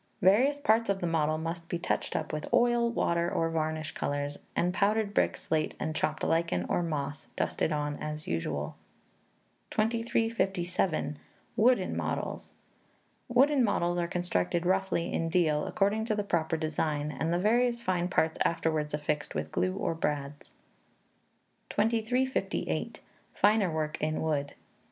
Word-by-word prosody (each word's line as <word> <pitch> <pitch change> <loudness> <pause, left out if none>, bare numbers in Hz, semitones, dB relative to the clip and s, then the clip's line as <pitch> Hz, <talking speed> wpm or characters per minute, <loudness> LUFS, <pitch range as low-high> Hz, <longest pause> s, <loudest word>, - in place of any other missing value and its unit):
Various 245 +10 +5
parts 230 -6 +3
of 195 -1 +1
the 175 - -2
model 155 -2 +1
must 165 +1 -5
be 175 - -1
touched 170 - -2
up - - -2
with 155 - -4
oil, 240 -1 +4
water, 170 -6 +1
or 165 0 0
varnish 155 -1 -1
colours; 145 0 -3 0.2
and 180 +1 +1
powdered 205 +1 +1
brick, - - +2
slate, 155 -1 -1
and 155 - -2
chopped 155 0 -1
lichen, 165 +1 +1
or - - +1
moss, 150 -3 -3
dusted - - 0
on 145 -1 -1
as 150 0 -5
usual. 75 -3 -2 0.9
2357. 215 -8 0 0.4
Wooden 245 +4 +3
Models. - - -3 0.8
Wooden 265 +2 +4
models 175 -5 +1
are 170 - 0
constructed 175 - -1
roughly 190 -2 +1
in 165 - 0
deal, 160 -4 +2
according 210 +3 +1
to 220 -2 0
the 205 - -1
proper 165 -4 0
design, 155 -1 -1
and 160 +4 -2
the 175 - +2
various 235 +4 +2
fine 180 -4 +1
parts 160 -3 +1
afterwards 155 -3 0
affixed 150 0 -2
with 75 0 -3
glue 90 +1 0
or - - -1
brads. 145 -2 -3 1.1
2358. 235 +4 0 0.3
Finer 205 -2 +4
Work 155 -1 -2
in 155 +1 0
Wood. 145 -3 -1
170 Hz, 140 wpm, -30 LUFS, 155-210 Hz, 1.1 s, Various